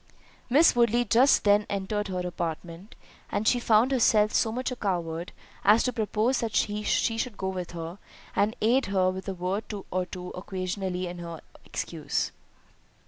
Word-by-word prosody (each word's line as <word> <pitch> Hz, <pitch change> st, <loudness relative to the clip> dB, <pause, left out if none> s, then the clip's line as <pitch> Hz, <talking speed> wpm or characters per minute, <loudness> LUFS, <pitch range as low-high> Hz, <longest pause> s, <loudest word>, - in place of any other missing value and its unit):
Miss 295 Hz, +5 st, +5 dB
Woodley 240 Hz, 0 st, +3 dB
just 245 Hz, +6 st, +4 dB
then 205 Hz, 0 st, +4 dB
entered 205 Hz, +1 st, -2 dB
her 180 Hz, -1 st, -3 dB
apartment, 170 Hz, +2 st, -5 dB, 0.4 s
and 215 Hz, -, -1 dB
she 245 Hz, -, +4 dB
found 230 Hz, +2 st, +3 dB
herself 215 Hz, -4 st, +3 dB
so 220 Hz, -, +2 dB
much 255 Hz, +3 st, -2 dB
a -, -, -3 dB
coward, 175 Hz, -5 st, -2 dB, 0.3 s
as 210 Hz, +3 st, +5 dB
to 250 Hz, -, 0 dB
propose 225 Hz, +2 st, 0 dB
that 225 Hz, -2 st, -3 dB
she 210 Hz, 0 st, +1 dB
should 225 Hz, +1 st, 0 dB
go 190 Hz, -, -2 dB
with 180 Hz, -2 st, -5 dB
her, 170 Hz, +2 st, -6 dB, 0.4 s
and 210 Hz, +2 st, +2 dB
aid 245 Hz, +5 st, +3 dB
her 185 Hz, -2 st, +2 dB
with 190 Hz, +1 st, -7 dB
a 190 Hz, -, -3 dB
word 185 Hz, +4 st, -2 dB, 0.3 s
or 185 Hz, 0 st, -1 dB
two 180 Hz, -1 st, -7 dB
occasionally 185 Hz, 0 st, -3 dB
in 175 Hz, 0 st, -6 dB
her 170 Hz, -1 st, -7 dB, 0.2 s
excuse. 155 Hz, -4 st, -3 dB
200 Hz, 165 wpm, -27 LUFS, 180-225 Hz, 0.4 s, Miss